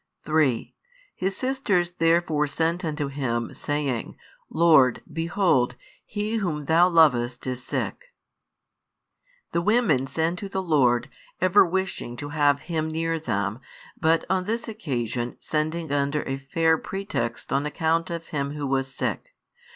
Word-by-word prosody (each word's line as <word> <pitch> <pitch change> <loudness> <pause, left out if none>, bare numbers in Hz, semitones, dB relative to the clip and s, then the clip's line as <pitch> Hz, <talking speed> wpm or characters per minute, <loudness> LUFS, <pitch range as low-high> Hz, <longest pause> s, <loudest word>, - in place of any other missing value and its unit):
3 150 -7 +1 0.4
His 190 +1 -2
sisters 235 -10 0
therefore 165 -2 +2
sent 165 +4 0
unto 150 -2 -2
Him, 125 -4 -2
saying, 145 -5 -3 0.3
Lord, 155 -7 +4
behold, 165 -7 +1 0.3
he 215 +2 -2
whom 170 -8 -2
Thou 170 +4 +5
lovest 125 -8 +3
is 125 -1 -4
sick. 480 - -3 1.5
The 170 - +1
women 185 - +2
send 165 +5 -1
to 200 -3 -6
the 190 -1 -2
Lord, 130 -8 +3 0.3
ever 185 +2 +6
wishing 175 -9 -3
to 145 +2 -6
have 145 -2 +2
Him 160 0 -2
near 165 +1 -1
them, 105 -6 -2 0.4
but 160 +1 +2
on 185 -1 0
this 230 +3 -2
occasion 125 - -3
sending 155 0 -2
under 140 +1 0
a 135 0 -3
fair 160 +3 +2
pretext 120 -12 -4
on 140 +2 +1
account 160 +2 0
of 170 -1 -5
him 140 -1 -2
who 145 -1 -3
was 135 0 0
sick. - - -4
160 Hz, 135 wpm, -25 LUFS, 135-175 Hz, 1.5 s, ever